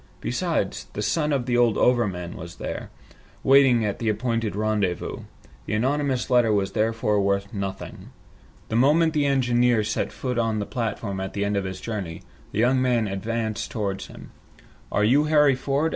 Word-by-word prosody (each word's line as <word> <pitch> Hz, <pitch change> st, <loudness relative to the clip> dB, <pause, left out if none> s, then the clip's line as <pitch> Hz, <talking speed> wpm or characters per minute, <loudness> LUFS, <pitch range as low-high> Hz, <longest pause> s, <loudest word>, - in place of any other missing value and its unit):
Besides, -, -, -2 dB
the 105 Hz, -, -3 dB
son 150 Hz, +5 st, 0 dB
of 135 Hz, -4 st, 0 dB
the 125 Hz, -1 st, 0 dB
old 120 Hz, -3 st, +3 dB
overman 95 Hz, -9 st, +1 dB
was 85 Hz, +1 st, -9 dB
there, -, -, -6 dB, 0.5 s
waiting 130 Hz, -4 st, +5 dB
at 100 Hz, -, -2 dB
the 115 Hz, -, 0 dB
appointed 115 Hz, -1 st, -1 dB
rendezvous. 105 Hz, -4 st, -1 dB, 0.5 s
The -, -, -1 dB
anonymous 135 Hz, +2 st, 0 dB
letter 120 Hz, -3 st, +4 dB
was 100 Hz, -2 st, +1 dB
therefore 110 Hz, -2 st, +1 dB
worth 100 Hz, 0 st, 0 dB
nothing. 95 Hz, -2 st, -6 dB, 0.6 s
The 110 Hz, -, -2 dB
moment 155 Hz, +6 st, +4 dB
the 145 Hz, -2 st, +2 dB
engineer 120 Hz, -4 st, +2 dB
set 110 Hz, +1 st, -2 dB
foot 125 Hz, -2 st, -3 dB
on 115 Hz, -2 st, 0 dB
the 105 Hz, -, -2 dB
platform 110 Hz, -5 st, -3 dB
at 95 Hz, 0 st, -4 dB
the 100 Hz, 0 st, -1 dB
end 100 Hz, 0 st, -1 dB
of 100 Hz, -1 st, -1 dB
his 95 Hz, 0 st, -5 dB
journey, 100 Hz, -8 st, -5 dB, 0.3 s
the -, -, -6 dB
young 125 Hz, +3 st, +3 dB
man 120 Hz, -4 st, +2 dB
advanced 110 Hz, +2 st, -3 dB
towards 100 Hz, -3 st, -3 dB
him. -, -, -12 dB, 0.6 s
"Are 105 Hz, -, +1 dB
you 135 Hz, +8 st, +4 dB
Harry 150 Hz, -2 st, +5 dB
Ford?" 140 Hz, +4 st, 0 dB
115 Hz, 175 wpm, -24 LUFS, 100-125 Hz, 0.6 s, waiting